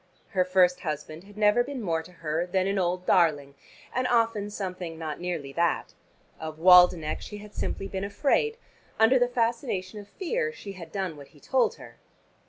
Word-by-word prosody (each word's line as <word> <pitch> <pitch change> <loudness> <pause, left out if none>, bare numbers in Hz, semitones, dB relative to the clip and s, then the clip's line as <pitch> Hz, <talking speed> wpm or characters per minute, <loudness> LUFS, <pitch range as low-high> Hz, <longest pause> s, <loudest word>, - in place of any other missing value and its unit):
Her 185 -3 +2
first 180 -1 +3
husband 155 +1 -5
had 205 +1 -16
never 215 +3 +4
been 275 +1 -6
more 165 -7 -1
to 170 - -14
her 165 0 -2
than 185 +1 +1
"an 195 0 0
old 180 0 -1
darling," 150 -6 +2 0.4
and 255 0 0
often 230 -4 +1
something 180 -5 -5
not 155 -2 -5
nearly 170 -6 -4
that. 170 +1 0 0.5
Of 155 -1 -6
Waldenech 180 -2 +6
she 210 - -8
had 210 0 -12
simply 195 - -3
been 190 -1 -4
afraid: 290 - +1 0.4
under 235 +4 +5
the 245 - +3
fascination 230 -4 -2
of 205 - -11
fear 460 - -2
she 205 - -9
had 170 -4 -10
done 185 -5 -3
what 140 -1 -11
he - - -18
told 260 - +1
her. - - -14
185 Hz, 185 wpm, -27 LUFS, 165-215 Hz, 0.5 s, Waldenech